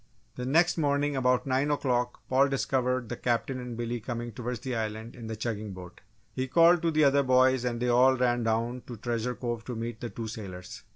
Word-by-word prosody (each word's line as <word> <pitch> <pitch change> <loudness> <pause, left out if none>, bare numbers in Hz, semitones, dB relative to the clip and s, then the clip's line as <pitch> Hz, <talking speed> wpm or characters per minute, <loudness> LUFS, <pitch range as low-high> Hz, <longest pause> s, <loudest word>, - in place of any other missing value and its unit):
The 125 0 -4
next 165 +5 +3
morning 145 -1 +1
about 125 -1 +2
nine 135 +2 +1
o'clock 125 -4 0
Paul 135 +2 +3
discovered 130 -2 0
the 120 - -4
Captain 125 +2 -1
and 125 -2 -6
Billy 120 0 -3
coming 120 +1 -5
toward 120 +2 -4
the 130 -2 -2
Island 110 +1 -4
in 115 -3 -8
the 110 - -4
chugging 110 -2 -4
boat. 90 -1 -11 0.3
He 130 0 -2
called 170 +4 +5
to 170 - +1
the 155 -1 +3
other 140 0 +5
boys 130 -1 +3
and 120 -1 -1
they 125 - 0
all 130 +2 +5
ran 120 -1 +2
down 115 +2 -1
to 120 - -7
Treasure 120 +2 -2
Cove 120 -2 -4
to 125 - -5
meet 115 0 -5
the 120 - -4
two 115 - -6
sailors. 95 -5 -8
125 Hz, 215 wpm, -28 LUFS, 115-130 Hz, 0.3 s, called